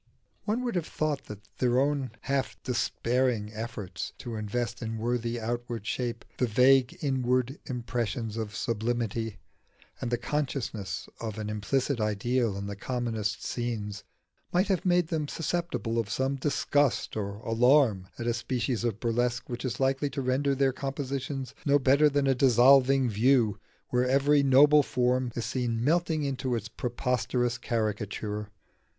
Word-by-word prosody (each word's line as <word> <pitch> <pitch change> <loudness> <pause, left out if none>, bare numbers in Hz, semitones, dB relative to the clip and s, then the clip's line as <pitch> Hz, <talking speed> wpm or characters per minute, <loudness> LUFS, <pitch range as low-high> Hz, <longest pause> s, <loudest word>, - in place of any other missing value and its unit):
One 225 +4 0
would 240 -2 -1
have 175 -3 -1
thought 155 -2 -2
that 105 0 -10
their 125 0 +3
own 140 -1 +1
half 135 -1 -1
despairing 125 -3 0
efforts 105 -6 -5
to 120 - -7
invest 115 +3 -3
in 115 -1 -3
worthy 120 +1 -1
outward 120 -1 -4
shape 120 0 -3
the 125 - +2
vague 125 +3 +4
inward 130 0 0
impressions 115 -2 -3
of 110 -2 -4
sublimity, 115 -2 -2 0.6
and 120 - -2
the 120 - +1
consciousness 125 -6 -3
of 110 -2 -5
an 105 -1 -3
implicit 125 +5 0
ideal 110 +1 0
in 100 - -4
the 100 0 -5
commonest 110 -2 -2
scenes, 110 -4 -3 0.5
might 185 +3 +2
have 185 -2 +1
made 175 -2 +3
them 155 -3 -1
susceptible 165 -8 -2
of 110 -3 -2
some 130 +4 0
disgust 145 0 +1
or 100 -2 -3
alarm 115 -4 +3
at 120 - -4
a 120 - +1
species 120 0 -2
of 115 -3 -1
burlesque 120 +1 -1
which 120 0 -4
is 130 - -3
likely 135 +2 +1
to 140 - -3
render 135 +2 +1
their 135 -1 +2
compositions 135 -1 -4
no 145 -1 +4
better 140 +2 +4
than 140 -1 +1
a 135 - +4
dissolving 130 +1 +5
view, 115 0 +3 0.3
where 125 0 +1
every 140 +2 +4
noble 145 +2 +6
form 125 -1 0
is 120 - -2
seen 120 -2 -1
melting 160 +1 +1
into 135 -2 -1
its 115 0 -4
preposterous 125 0 -1
caricature. 105 -2 -2
125 Hz, 150 wpm, -28 LUFS, 115-135 Hz, 0.6 s, noble